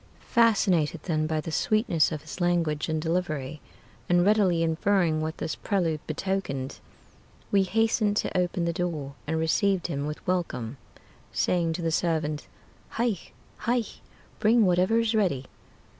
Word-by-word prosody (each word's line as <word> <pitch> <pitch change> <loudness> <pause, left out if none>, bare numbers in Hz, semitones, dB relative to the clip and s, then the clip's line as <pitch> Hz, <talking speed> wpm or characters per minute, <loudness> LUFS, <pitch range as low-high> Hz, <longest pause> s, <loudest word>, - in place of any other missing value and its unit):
Fascinated 185 -9 +3
then 155 -3 0
by 155 0 0
the 160 - -5
sweetness 195 -3 +2
of 155 -2 -5
his 155 +4 -8
language 170 -4 +1
and 160 0 0
delivery, 155 -4 -2 0.5
And 175 0 +4
readily 195 -5 +3
inferring 165 -1 +2
what 155 0 -3
this - - -3
prelude 170 -7 0
betokened, 155 -6 -3 0.7
We 200 - +5
hasted 215 +1 +1
to - - -1
open 180 -1 0
the 170 - 0
door, 160 -6 -3
and 160 +1 0
received 180 +3 +1
him 145 -3 -2
with 150 - -6
welcome, 145 -9 -2 0.5
Saying 170 -2 +1
to 170 +1 -4
the 165 - 0
servant, 155 -3 -1 0.4
"Hie! 230 -5 0 0.4
Hie! 240 0 +1 0.6
Bring 220 +1 +4
whatever 185 +5 +3
is 230 -1 +1
ready!" 180 -12 +1
175 Hz, 145 wpm, -27 LUFS, 155-195 Hz, 0.7 s, We